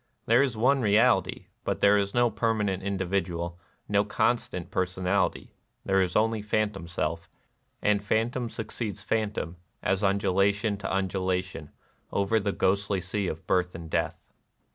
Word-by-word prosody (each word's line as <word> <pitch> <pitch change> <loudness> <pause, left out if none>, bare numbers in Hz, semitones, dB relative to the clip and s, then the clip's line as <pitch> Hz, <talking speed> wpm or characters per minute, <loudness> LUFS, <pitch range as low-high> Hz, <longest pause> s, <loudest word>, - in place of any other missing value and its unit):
There 115 +3 +5
is 130 -5 0
one 135 +4 +3
Keality; 105 -2 +3 0.2
but - - -1
there 100 0 +5
is 100 +1 0
no 120 -1 +4
per 115 -1 +1
manent 100 -3 -1
individual, 95 -3 -2 0.3
no 100 0 +3
constant 100 -4 -1
personality: 95 +1 0 0.3
there 95 0 +3
is 90 -2 -1
only 110 0 +2
phantom 105 -4 -1
self, 85 0 -3 0.5
and 105 -1 +2
phantom 115 +3 0
suc 110 - -6
ceeds 105 -4 -3
to - - -16
phantom, 105 -7 -1 0.3
as 95 +1 +1
undulation 100 +1 +2
to 100 - -5
undula 95 -1 0
tion, 80 -5 -10 0.4
over 100 +3 +2
the 100 -1 -1
ghostly 100 +1 +1
Sea 95 +2 -2
of 80 - -5
Birth 90 -1 +1
and 85 -1 -8
Death. - - -1
100 Hz, 155 wpm, -27 LUFS, 95-110 Hz, 0.5 s, There